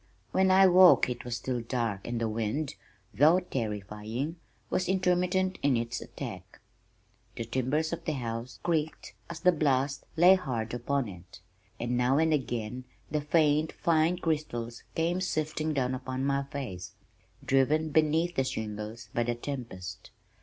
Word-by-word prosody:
When 190 Hz, 0 st, +3 dB
I 190 Hz, +1 st, +7 dB
woke 180 Hz, -7 st, +7 dB
it 120 Hz, -1 st, -5 dB
was 120 Hz, -1 st, -3 dB
still 125 Hz, 0 st, -2 dB
dark 115 Hz, -4 st, -2 dB
and 120 Hz, -1 st, -2 dB
the 115 Hz, -, 0 dB
wind, 115 Hz, +7 st, -2 dB, 0.4 s
though 150 Hz, -, +5 dB
terrifying, 110 Hz, -, -4 dB, 0.3 s
was 180 Hz, -, 0 dB
intermittent 185 Hz, 0 st, +1 dB
in 140 Hz, -3 st, +3 dB
its 115 Hz, +1 st, -3 dB
attack. -, -, -8 dB, 0.8 s
The 115 Hz, -, -4 dB
timbers 130 Hz, +7 st, 0 dB
of 170 Hz, -, -5 dB
the 155 Hz, -, 0 dB
house 120 Hz, -2 st, -5 dB
creaked 160 Hz, -2 st, -1 dB, 0.2 s
as 170 Hz, 0 st, -7 dB
the 180 Hz, -, +6 dB
blast 140 Hz, -3 st, +1 dB
lay 175 Hz, +3 st, +8 dB
hard 125 Hz, -12 st, -2 dB
upon 125 Hz, +2 st, -1 dB
it, 90 Hz, -3 st, -11 dB, 0.4 s
and 120 Hz, +1 st, -1 dB
now 125 Hz, +2 st, +3 dB
and 160 Hz, 0 st, +3 dB
again 125 Hz, -3 st, -2 dB, 0.3 s
the 150 Hz, 0 st, 0 dB
faint 155 Hz, 0 st, +2 dB
fine 165 Hz, +1 st, +2 dB
crystals 135 Hz, -9 st, -2 dB
came 170 Hz, +3 st, 0 dB
sifting 155 Hz, -3 st, -1 dB
down 130 Hz, -3 st, 0 dB
upon 130 Hz, +1 st, -3 dB
my 140 Hz, 0 st, +1 dB
face, 135 Hz, -11 st, -6 dB, 0.5 s
driven 150 Hz, +4 st, +2 dB
beneath 160 Hz, +3 st, +2 dB
the 135 Hz, -, +2 dB
shingles 110 Hz, -1 st, -5 dB
by 120 Hz, -, +1 dB
the 120 Hz, 0 st, 0 dB
tempest. 120 Hz, -8 st, -6 dB
135 Hz, 150 wpm, -29 LUFS, 120-160 Hz, 0.8 s, lay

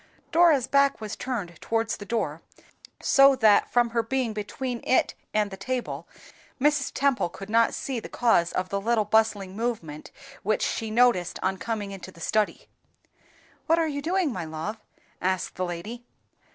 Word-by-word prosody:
Dora's 325 Hz, -6 st, +5 dB
back 280 Hz, 0 st, +3 dB
was 215 Hz, -1 st, -5 dB
turned 200 Hz, -10 st, -5 dB
towards 225 Hz, 0 st, -1 dB
the 205 Hz, -, -10 dB
door, 165 Hz, -9 st, -2 dB, 0.6 s
so 275 Hz, -1 st, +6 dB
that, 220 Hz, -5 st, +4 dB
from 240 Hz, -1 st, +3 dB
her 230 Hz, 0 st, +2 dB
being 240 Hz, 0 st, -1 dB
between 235 Hz, +4 st, -4 dB
it 260 Hz, -, +2 dB, 0.2 s
and 210 Hz, -1 st, +1 dB
the -, -, -5 dB
table, 245 Hz, +5 st, -4 dB, 0.5 s
Mrs. 295 Hz, 0 st, +2 dB
Temple 275 Hz, -9 st, +1 dB
could 195 Hz, +4 st, -9 dB
not 230 Hz, 0 st, +3 dB
see 260 Hz, -3 st, -3 dB
the -, -, -9 dB
cause 205 Hz, -8 st, +2 dB
of 185 Hz, 0 st, -2 dB
the 200 Hz, 0 st, -2 dB
little 225 Hz, 0 st, +1 dB
bustling 210 Hz, -3 st, +1 dB
movement 205 Hz, -10 st, -4 dB, 0.3 s
which 215 Hz, +2 st, 0 dB
she 225 Hz, -, -2 dB
noticed 220 Hz, -6 st, +3 dB
on 190 Hz, 0 st, 0 dB
coming 210 Hz, -1 st, -3 dB
into 190 Hz, -1 st, -8 dB
the 170 Hz, -, -17 dB
study. 215 Hz, +5 st, -1 dB, 1.0 s
"What 330 Hz, -, +4 dB
are 330 Hz, -1 st, +2 dB
you 285 Hz, -2 st, -3 dB
doing, 340 Hz, -2 st, 0 dB
my -, -, -4 dB
love?" 160 Hz, +7 st, -5 dB, 0.4 s
asked 185 Hz, 0 st, -1 dB
the 185 Hz, -, -2 dB
lady. 180 Hz, +8 st, -6 dB
225 Hz, 165 wpm, -26 LUFS, 195-255 Hz, 1.0 s, so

